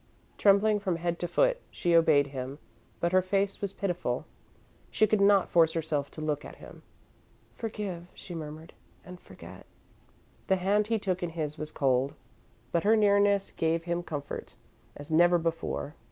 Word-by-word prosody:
Trembling 205 +1 +4
from 190 -4 -1
head 170 0 -2
to 175 - -2
foot, - - +2
she 175 -3 -1
obeyed 155 -4 +5
him, 135 0 -6 0.4
but 170 - 0
her 185 0 +4
face 195 +1 -1
was 200 -2 -2
pitiful. 180 -11 -2 0.6
She 215 - +3
could 215 -1 +1
not 200 -1 +5
force 165 -2 +4
herself 155 -3 -2
to 155 - -9
look 150 -1 -2
at - - -10
him. - - -13 0.7
"Forgive," 205 -6 -5
she 180 - -9
murmured, 155 0 -8 0.3
"and 180 0 -10
forget." - - -13 0.8
The 190 - +4
hand 200 +3 +1
he 225 0 +1
took 185 -3 -2
in 175 - -2
his 155 -2 -4
was 155 0 -4
cold, 135 -1 +1 0.6
but 170 - +1
her 215 +2 +5
nearness 200 -2 +3
gave 165 +1 0
him 170 0 -2
comfort, 145 -4 -6 0.4
as 145 +2 -10
never 175 +2 +5
before. 165 -3 -3
175 Hz, 165 wpm, -29 LUFS, 155-200 Hz, 0.8 s, obeyed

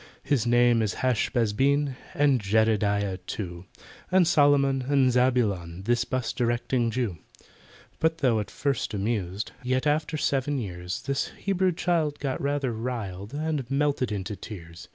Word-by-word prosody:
"His 130 -6 +1
name 120 -1 +4
is 105 -2 -1
HASH 125 -3 +2
BAZ 115 -5 +1
BEN, 140 +3 +2 0.2
And 140 -4 +3
JEDEDIAH 105 -2 +1
too, 90 -3 -5 0.5
And 185 -1 +5
SOLOMON 145 -4 +4
and 135 -3 +4
ZABULON— 105 -9 +1
This 120 +3 +1
'bus 125 -2 -2
directing 120 0 0
Jew." 110 -8 -2 0.8
But 160 0 +2
though 125 -8 +2
at 105 - -4
first 135 -6 -2
amused, 100 -1 -2
Yet 130 +2 0
after 150 +1 +1
seven 140 0 0
years, 90 -5 -5
This 140 0 -1
Hebrew 190 -2 +1
child 160 -4 0
got 135 -3 -3
rather 140 -3 0
riled, 110 -2 -5
And 150 -4 -2
melted 140 -4 +1
into 100 0 -3
tears. 85 -5 -10
125 Hz, 145 wpm, -26 LUFS, 105-140 Hz, 0.8 s, And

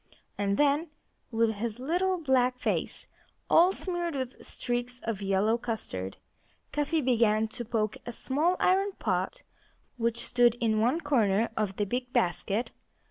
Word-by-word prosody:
And 200 0 0
then, 295 +3 +2 0.4
with 225 -1 +2
his 220 +1 -3
little 355 +8 0
black 255 -5 +2
face - - -1 0.5
all 350 +3 +7
smeared 350 -4 -3
with 260 -1 -4
streaks 245 +1 -3
of 225 -3 -3
yellow 200 +4 +2
custard, 95 - -4 0.5
Cuffy 295 +2 0
began 225 -4 +3
to 240 - -6
poke 220 -2 -1
a 240 - -5
small 300 +9 0
iron 390 +2 +3
pot - - -2 0.5
which 235 0 0
stood 240 -1 +4
in 225 -3 +1
one 250 +10 +2
corner 230 -7 +2
of 210 -3 -1
the 205 - 0
big 245 +4 -3
basket. 195 +6 0
240 Hz, 140 wpm, -29 LUFS, 220-290 Hz, 0.5 s, all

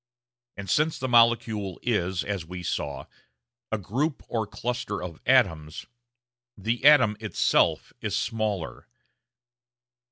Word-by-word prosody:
And 100 0 -7
since 150 - +1
the 130 - -3
molecule 115 -5 +2
is, 95 -6 0
as 100 -4 -3
we 90 +2 -8
saw, 70 -5 -3 0.7
a 110 - +1
group 130 - -2
or 110 -2 -2
cluster 120 -3 -4
of 85 -3 -8
atoms, 85 -12 +2 0.7
the 115 +5 -2
atom 130 -8 +6
itself 110 -1 +1
is - - -2
smaller. 105 - -3
105 Hz, 115 wpm, -26 LUFS, 90-120 Hz, 0.7 s, atom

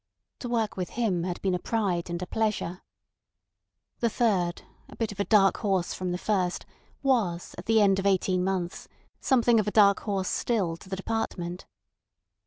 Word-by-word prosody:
To 245 - -5
work 225 -3 0
with 180 -2 -3
him 190 -8 +1
had 180 -1 -3
been 190 -2 +1
a 180 - 0
pride 185 -6 -1
and 170 0 -3
a - - -3
pleasure. 210 -4 -2 1.2
The 235 - +2
third, 190 -7 0 0.3
a - - -12
bit 225 -2 -2
of 205 - -11
a - - +3
dark 200 -3 +4
horse 195 -5 0
from 185 -1 -3
the 175 - -1
first, 185 -2 -1 0.4
was 210 -11 0
at 175 - -10
the 225 0 +4
end 195 -1 +4
of 195 - 0
eighteen 185 -1 +2
months 185 -2 -2 0.3
something 240 -3 +3
of 215 - 0
a - - 0
dark 200 -2 +5
horse 195 -3 -2
still 195 -9 0
to 185 - -15
the 190 - -2
department. 190 -4 -4
195 Hz, 185 wpm, -27 LUFS, 180-220 Hz, 1.2 s, dark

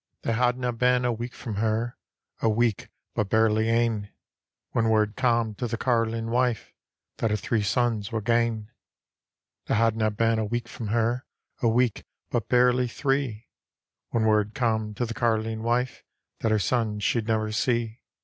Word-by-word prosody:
They 115 - 0
hadna 125 +1 +1
heen 125 +1 +2
a 125 - +2
week 120 +2 -5
from 110 -6 -5
her, 115 +2 0 0.5
A 115 - +3
week 115 -1 +1 0.2
but 105 -2 -1
barely 110 0 +3
ane. 115 -3 +1 0.6
When 115 -1 +1
word 105 -1 +2
cam' 115 -4 +1
to 120 - -2
the 115 0 -3
carlinc 115 -2 0
wife 125 -2 0 0.4
That 115 - 0
her 105 - +1
three 110 +2 0
sons 110 0 0
were 110 - -1
gane. 115 -1 0 1.0
They - - +1
hadna 110 -1 +2
been 115 +1 +1
a 110 - 0
week 120 +3 -2
from 115 - -6
her, 115 +4 0 0.3
A 120 - +3
week 120 0 +2 0.3
but 115 -4 -1
barely 125 0 +4
three, 135 -3 -2 0.6
When 115 - 0
word 105 -1 +2
cam' 110 -4 0
to 120 - -1
the 115 - -5
catline 110 -1 0
wife 120 +2 -1 0.4
That 115 - 0
her 110 - +3
sons 105 -1 0
she'd 115 0 +1
never 110 -1 0
see. 115 +1 -1
115 Hz, 165 wpm, -26 LUFS, 110-120 Hz, 1.0 s, barely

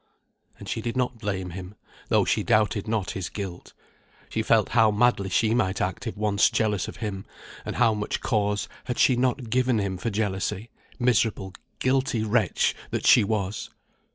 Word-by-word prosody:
And - - -11
she - - -3
did 120 +1 -3
not 125 -2 -1
blame 95 -4 -3
him, 95 +3 -8 0.3
though - - +3
she - - +1
doubted 105 -1 +1
not 110 -3 -1
his 95 -3 -4
guilt; 95 -4 -7 0.6
she - - -1
felt - - +3
how 110 -2 +4
madly 105 -2 +2
she 110 +4 +2
might 105 -5 0
act 95 +6 -2
if 110 - -5
once 105 -1 +3
jealous 105 -4 0
of - - -8
him, 95 -2 -4 0.4
and - - -4
how 115 - +4
much 105 -1 -2
cause 105 -3 0 0.2
had 125 -1 -3
she 130 - +4
not 125 -1 -1
given 125 -1 +2
him 100 -3 -1
for 105 - -2
jealousy, 105 +1 -2 0.3
miserable 115 -6 +1 0.2
guilty 130 -3 +1
wretch 110 -3 +1 0.2
that - - -3
she - - +7
was! 100 -1 -2
105 Hz, 175 wpm, -25 LUFS, 100-120 Hz, 0.6 s, she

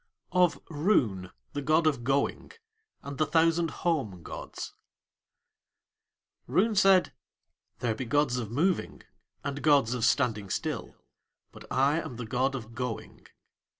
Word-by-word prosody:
OF 175 -6 +3
ROON, 135 - +1 0.2
THE 145 - -2
GOD 155 +3 +3
OF 140 -6 +1
GOING, 135 - -1 0.5
AND 140 -1 -7
THE 155 - +4
THOUSAND 165 0 +3 0.2
HOME 110 - 0
GODS - - -7 1.7
Roon 220 +4 +2
said: 195 -2 +4 0.7
"There 120 -3 +1
be 125 +4 -5
gods 135 0 +1
of 115 -4 -3
moving 165 - 0 0.4
and 140 0 -4
gods 140 -6 +4
of 125 -2 -2
standing 115 -6 +1
still, - - -3 0.6
but - - -14
I 140 +5 +2
am 155 -7 -7
the 125 0 -5
god 130 +4 0
of 115 -3 -7
Going." 125 -2 -6
140 Hz, 130 wpm, -29 LUFS, 120-160 Hz, 1.7 s, THE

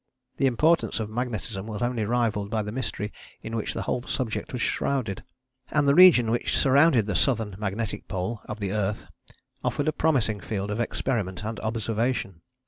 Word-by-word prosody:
The 135 - +3
importance 155 +4 +2
of 110 -1 -4
magnetism 110 -4 -4
was 110 0 -3
only 120 -3 0
rivalled 110 -3 0
by 110 0 0
the 105 - -5
mystery 110 -4 -3 0.3
in 115 - -5
which 110 - -3
the - - -2
whole 125 - -1
subject 120 -3 -3
was 125 -2 -2
shrouded: 125 -8 -1 0.5
and 145 -2 +2
the 140 - +6
region 150 -10 +7
which 120 - 0
surrounded 140 -4 +5
the 105 - -2
Southern 110 -7 +1
Magnetic 105 +1 -3
Pole 95 +4 -3
of 105 0 -6
the 100 -2 -2
earth 105 0 -1 0.6
offered - - -1
a 155 - +2
promising 120 -9 +1
field 100 +1 -3
of 105 - -2
experiment 110 -5 -2
and 110 0 -4
observation. 110 -4 -2
110 Hz, 175 wpm, -26 LUFS, 105-125 Hz, 0.6 s, region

